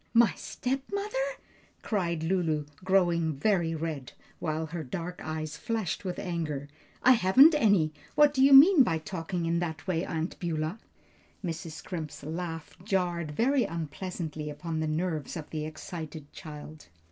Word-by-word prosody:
"My 230 -3 +6
stepmother!" 335 - -3 0.7
cried 170 -6 -1
Lulu, 160 -4 +1 0.2
growing 175 -4 +2
very 170 -1 +2
red, 155 -5 -4 0.3
while 155 0 -1
her 160 +1 -5
dark 175 +5 -5
eyes 155 -1 -4
flashed 220 -7 -2
with 180 -2 -3
anger. 155 -6 -3 0.4
"I 255 - +8
haven't 255 - +7
any! 200 - +3 0.2
What 295 -1 +6
do 265 -2 +3
you 275 - +6
mean 295 +4 +9
by 165 -10 +3
talking 170 0 -4
in 170 +1 +1
that 160 -2 -4
way, 180 -3 0
Aunt 165 -1 -3
Beulah?" 165 +3 -2 0.7
Mrs. 165 -1 -4
Scrimp's 155 -3 -6
laugh 165 0 -5
jarred 180 -5 0
very 250 - +2
unpleasantly 160 -2 -4
upon 160 +2 -4
the 155 - 0
nerves 155 0 -2
of 155 - -8
the 155 -1 -3
excited 155 -2 -8
child. 155 -3 -10
170 Hz, 145 wpm, -29 LUFS, 155-190 Hz, 0.7 s, mean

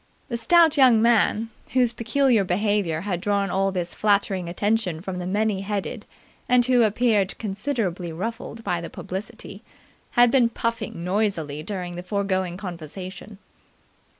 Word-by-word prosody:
The 235 - -2
stout 320 +6 +4
young 255 -5 +6
man, 225 -1 +2 0.2
whose 250 -2 +3
peculiar 235 -1 +2
behaviour 190 -3 0
had 180 -3 -3
drawn 200 -1 0
all 195 +1 +1
this 175 -2 -3
flattering 200 -4 +1
attention 200 -2 0
from 180 +1 -5
the 180 - -4
many 205 0 0
headed 200 0 -4 0.4
and 250 -1 +5
who 250 -1 +4
appeared 215 -3 +2
considerably 200 -5 -3
ruffled 225 +6 -5
by 175 -4 -1
the 170 - -6
publicity, 205 +1 -7 0.6
had 240 -1 +6
been 245 -3 +4
puffing 230 -6 -3
noisily 180 -6 -1
during 180 0 -5
the - - -4
foregoing 185 -1 -1
conversation. 185 +2 -8
205 Hz, 140 wpm, -24 LUFS, 180-230 Hz, 0.6 s, young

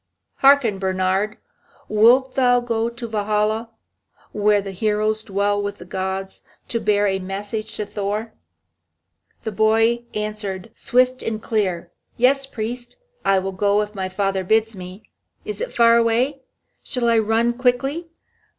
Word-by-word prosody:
Hearken, 270 -8 +4
Bernhard, 190 +2 0 0.5
wilt 245 +5 +4
thou 245 -2 +4
go 230 -1 -1
to 235 0 -7
Valhalla, 215 +1 0 0.6
where 210 0 +3
the 195 -1 -5
heroes 215 +2 0
dwell 205 0 0
with 205 0 -4
the 175 - -11
gods, 190 +1 -4 0.3
to 230 - 0
bear 205 -2 +2
a 190 -1 +1
message 205 +3 -5
to 210 - -3
Thor?" 210 +2 -3 1.1
The 220 - -3
boy 225 +3 +2
answered, 210 -1 -4
swift 255 +1 +1
and 220 -1 -3
clear: 200 -6 -2 0.3
"Yes, 270 +3 +3
priest, 240 0 -6 0.3
I 195 0 +3
will 190 +1 -1
go 200 +2 +2
if 210 0 -9
my 190 -2 -3
father 195 0 -1
bids 220 +3 +1
me. 185 +3 -9 0.4
Is 425 +1 -5
it - - -3
far 230 0 +5
away? 240 +5 +1 0.4
Shall 245 -2 -1
I 230 -1 +4
run 225 +2 +2
quickly? 270 +7 0
215 Hz, 140 wpm, -21 LUFS, 200-235 Hz, 1.1 s, far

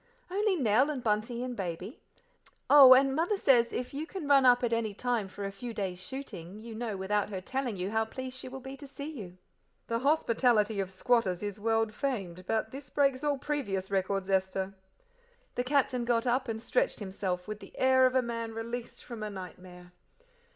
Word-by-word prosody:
"Only 405 +1 +2
Nell 255 - +3
and 275 -5 -3
Bunty 225 +2 0
and 250 -1 -4
Baby. 185 +3 -5 0.7
Oh, 270 -3 +11
and 270 +1 +3
Mother 345 +7 +1
says 240 -9 +4
if 250 - -4
you 300 +3 -4
can 360 -6 -6
run 275 -2 +6
up 245 0 +5
at 235 -1 +1
any 220 -3 -1
time 240 -3 -1
for 200 +1 -7
a 195 - -3
few 230 +4 -7
days 185 -3 -3
shooting 190 -6 -7
you 225 +1 -9
know 220 -2 -4
without 200 +2 0
her 195 -3 -4
telling 250 +2 -3
you 185 +2 -3
how 220 0 +1
pleased 260 +3 -6
she 255 - -7
will 265 +1 -8
be 265 +1 -7
to 285 0 -10
see 280 +2 -7
you." 190 - -9 0.5
"The 230 0 -1
hospitality 235 -6 +2
of 190 -2 -1
squatters 195 -2 +1
is 205 0 -4
world 225 0 +1
famed, 190 -10 -3
but 220 -1 0
this 275 0 -8
breaks 275 -2 +1
all 290 -1 +1
previous 200 -11 -3
records, 195 0 0
Esther." 190 0 0 0.8
The 245 - -1
Captain 255 -2 +1
got 235 0 +1
up 255 +2 +1
and 225 -1 -3
stretched - - 0
himself 190 -2 -3
with 215 -1 -5
the 195 - -14
air 260 0 +5
of 255 - -3
a 260 - +4
man 230 -1 -4
released 235 +1 -5
from 235 -3 -8
a 215 - -3
nightmare. 180 -2 -10
230 Hz, 200 wpm, -30 LUFS, 200-260 Hz, 0.8 s, Oh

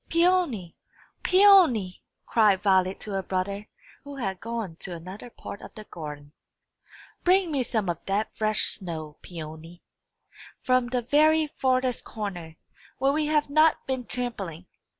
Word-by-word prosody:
"Peony, 335 - +2 0.5
Peony!" 360 - +5 0.2
cried 210 -4 +3
Violet 190 -1 +3
to 210 - -5
her 195 -1 -1
brother, 195 +3 -3 0.4
who 285 -1 -9
had 195 -8 -3
gone 230 -7 -4
to 180 -1 -6
another 185 +8 -9
part 205 - -9
of - - -12
the 215 - -8
garden, 150 -6 -9 0.9
"bring 365 -1 +3
me 280 -3 +1
some 220 -5 -1
of 170 -1 -3
that 205 +3 -1
fresh 215 -1 +1
snow, 160 -5 -3
Peony, 165 0 -9 0.8
from 255 -1 +2
the 245 0 -1
very 310 +5 +4
farthest 255 -4 0
corner, 175 -7 -6 0.4
where 270 +1 +2
we 305 +1 0
have 300 -1 +2
not 310 +2 +3
been 260 -1 -2
trampling. 205 -10 -5
215 Hz, 140 wpm, -26 LUFS, 185-275 Hz, 0.9 s, Peony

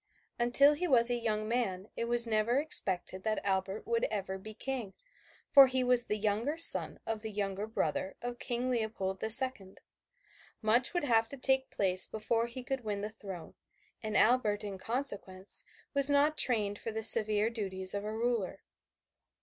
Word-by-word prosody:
Until 260 +5 +3
he 355 +5 -4
was 245 -4 +4
a - - -1
young 215 -2 -4
man 210 -5 -4
it 230 - -5
was 240 0 +3
never 225 +2 -2
expected 190 - -1
that 215 +1 -4
Albert 195 +1 -4
would 465 +1 -2
ever 190 - -6
be 215 +2 -13
King, 250 -7 -7 0.6
for 275 -1 +6
he 260 0 -2
was 250 -1 +2
the 210 - -4
younger 220 +8 -4
son 335 - +5
of 225 -1 -6
the 220 - -8
younger 200 0 -6
brother 190 -3 -5
of 245 0 -8
King 250 0 -5
Leopold 215 -5 -5
the 220 - -5
Second. 225 -6 +3 0.8
Much 235 +8 -1
would 350 - -2
have 225 -4 0
to 280 - -11
take 265 0 0
place 185 -2 +4
before 225 +2 -4
he 245 +2 -11
could 265 0 -6
win 205 -2 -6
the 210 +1 -7
throne, 195 -6 -12 0.5
and 215 -2 -4
Albert, 215 -3 0
in 200 -2 -9
consequence, 205 -6 -5 0.3
was 280 0 +4
not 290 +2 0
trained 210 -7 -1
for 225 - -7
the 220 0 -6
severe 215 -1 +9
duties 190 -4 -1
of 200 0 -6
a 210 - -7
ruler. 225 -4 -5
220 Hz, 175 wpm, -29 LUFS, 205-250 Hz, 0.8 s, severe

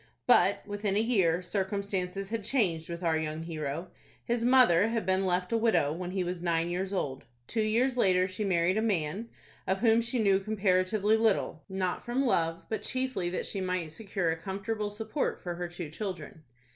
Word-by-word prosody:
But, 200 -5 +4
within 205 -1 -2
a - - +3
year, 190 -7 +2
circumstances 195 0 -2
had 225 -2 -2
changed 185 -10 0
with 170 +1 -5
our 160 -2 +2
young 155 0 -3
hero. 160 +1 -4 0.4
His 235 0 0
mother 240 -7 +5
had 225 -3 -1
been 190 +1 +1
left 180 +2 0
a 230 - +3
widow 220 -10 +2
when 175 +2 -5
he 185 0 -1
was 175 0 -4
nine 170 -1 0
years 185 +2 -2
old. 140 -9 -3 0.2
Two 225 - -1
years 240 +4 +1
later 185 -5 +3
she 195 +3 -4
married 185 0 +2
a - - +1
man, 200 +1 -1 0.4
of 190 +1 0
whom 230 -1 +5
she 240 +2 -2
knew 200 -4 +3
comparatively 200 +1 +2
little, 215 -8 +1
not 190 -1 -2
from 250 +3 0
love, 165 -8 +1
but 220 - -3
chiefly 255 -9 -2
that 180 - -3
she 195 - -3
might 180 -4 -2
secure 195 -3 -2
a - - 0
comfortable 200 +5 -3
support 220 +7 -2
for 175 - -3
her 175 0 -4
two 175 -3 -7
children. 170 -4 -6
190 Hz, 190 wpm, -30 LUFS, 175-220 Hz, 0.4 s, mother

